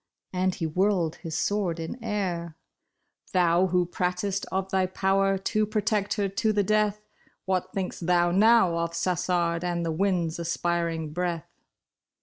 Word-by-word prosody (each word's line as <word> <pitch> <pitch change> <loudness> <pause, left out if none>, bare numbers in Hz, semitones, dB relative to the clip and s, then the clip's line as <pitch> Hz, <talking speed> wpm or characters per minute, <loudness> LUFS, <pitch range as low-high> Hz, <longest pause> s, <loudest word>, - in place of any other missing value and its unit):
" - - -64
and 185 0 +1
he 165 - -3
whirled 175 0 +1
his 165 -3 -5
sword 195 -5 0
in 195 +9 -6
air, 180 -7 -3 0.4
" - - -31
Thou 180 0 +4
who 180 0 +2
pratest 180 +3 -2
of 190 0 -2
thy 190 -1 +2
power 195 +1 +1
to 215 +3 0
protect 210 -1 0
her 205 -2 0
to 195 +3 0
the 205 -1 +2
death, 210 +1 +1 0.4
What 185 -1 -1
think' 190 -2 -3
St 170 - -7
thou 175 -1 +3
now 195 -3 +4
of 170 0 -2
Sassard 175 -1 0
and 175 -1 -1
the 165 - -1
wind's 170 -2 0
aspiring 170 -2 -1
breath 175 -2 -2
180 Hz, 160 wpm, -27 LUFS, 170-195 Hz, 0.4 s, Thou